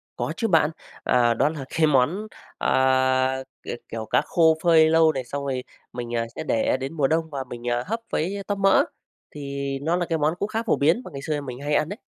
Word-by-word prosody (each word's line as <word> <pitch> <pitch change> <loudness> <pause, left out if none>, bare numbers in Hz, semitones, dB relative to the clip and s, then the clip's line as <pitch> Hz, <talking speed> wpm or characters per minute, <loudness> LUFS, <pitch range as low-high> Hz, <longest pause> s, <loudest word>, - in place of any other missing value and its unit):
Có - - -3
chứ 225 - 0
bạn. 160 -5 +3 0.3
À, 120 -1 +3
đó 135 +6 +2
là 150 -4 -6
cái 160 -1 +4
món, 150 +10 +2 0.3
à, 130 0 +2 0.2
k - - -19 0.2
kiểu 110 -1 -5
cá - - +2
khô 160 -2 +3
phơi 160 -2 +6
lâu 160 0 +5
này, 135 -4 -4
xong 140 +3 -5
rồi 130 -2 -2 0.3
mình, 120 -1 -4
à, 115 0 0
sẽ - - -4
để 115 +3 +1
đến 135 +3 -5
mùa 145 -4 +2
đông 160 +2 0
và 140 -3 -4
mình, 120 -1 -8
à, 120 0 0
hấp 225 +3 -2
với 195 +5 -1
tóp 205 - -1
mỡ, 195 0 +5 0.5
thì 140 -1 -4
nó 165 +4 +1
là 175 0 0
cái 165 -1 -1
món 155 +1 +1
cũng 200 - -1
khá 225 +1 -2
phổ 230 - +2
biến 160 - +2
mà - - -9
ngày 140 - -6
xưa 150 0 -2
mình 125 -3 -7
hay 145 +1 -2
ăn 150 +1 +1
đấy. 205 +4 -6
145 Hz, 235 wpm, -24 LUFS, 130-165 Hz, 0.5 s, phơi